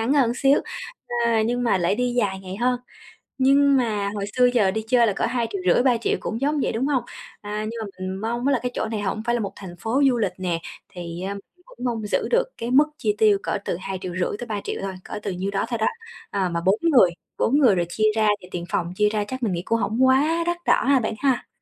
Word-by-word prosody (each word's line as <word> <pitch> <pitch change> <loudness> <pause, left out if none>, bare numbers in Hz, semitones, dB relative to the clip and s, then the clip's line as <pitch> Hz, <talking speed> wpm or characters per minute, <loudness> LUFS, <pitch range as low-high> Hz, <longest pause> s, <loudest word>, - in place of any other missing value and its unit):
ngắn 230 +5 +1
hơn 250 -5 +3
xíu, 275 +2 +3 0.6
a, 225 -2 +3
nhưng 245 +2 0
mà 230 -6 +2
lại 175 +3 +1
đi 245 +1 0
dài 200 -5 0
ngày 190 0 -7
hơn. 245 +2 +1 0.6
Nhưng 275 +1 +5
mà 210 -5 0
hồi 200 - -2
xưa 250 0 +5
giờ 200 -6 +3
đi 220 +2 -2
chơi 240 -1 +4
là 205 - +1
cỡ - - -1
2.500.000-3.000.000 230 +1 +1
cũng 225 +3 -4
giống 295 +1 +1
vậy, - - 0
đúng 240 +5 -1
hông? 265 -4 +1 0.4
À, 210 +1 -4
nhưng 230 - -6
mà - - -3
mình 185 0 -3
mong 235 +3 -1
á 280 - +3
là 250 - +2
cái 250 0 -2
chỗ - - -1
này 220 -2 -3
hổng 205 +2 -2
phải 240 +1 +1
là 235 - -1
một 200 -2 -3
thành 185 -3 -9
phố 245 +6 0
du 245 - +1
lịch 220 - 0
nè, 175 -3 -1 0.3
thì, 175 -1 -7
à, 200 - -3
mình 200 - -8 0.2
cũng 245 - -9
mong 225 -3 -2
giữ - - 0
được - - +4
cái 235 +2 -4
mức 290 +3 +6
chi 210 -3 0
tiêu 215 -2 +5
cỡ 210 - -1
từ - - -2
2.500.000-3.000.000 195 +4 -3
thôi, 195 -1 -3
cỡ - - -6
từ 200 - -2
nhiêu 190 +2 -3
đó 195 - 0
thôi 235 - -1
đó. 220 - +2 0.4
À, 190 -3 0
mà 170 0 -2
4 195 +3 +4
người, 270 - +5 0.3
4 280 +6 +3
người 240 -9 +5
rồi 175 -1 +1
chia 215 +4 +2
ra 220 -1 +3
thì 180 - -12
tiền 175 -1 -4
phòng 175 0 -1
chia 210 +1 +3
ra 210 -1 -1
chắc 260 +1 -5
mình 210 - +1
nghĩ 170 - -2
cũng 230 0 +1
hổng 235 +5 +2
quá 300 +6 +3
đắt 345 0 0
đỏ - - +3
ha 275 -2 +5
bạn 220 - -2
ha. 265 -3 +1
220 Hz, 255 wpm, -23 LUFS, 195-250 Hz, 0.6 s, mức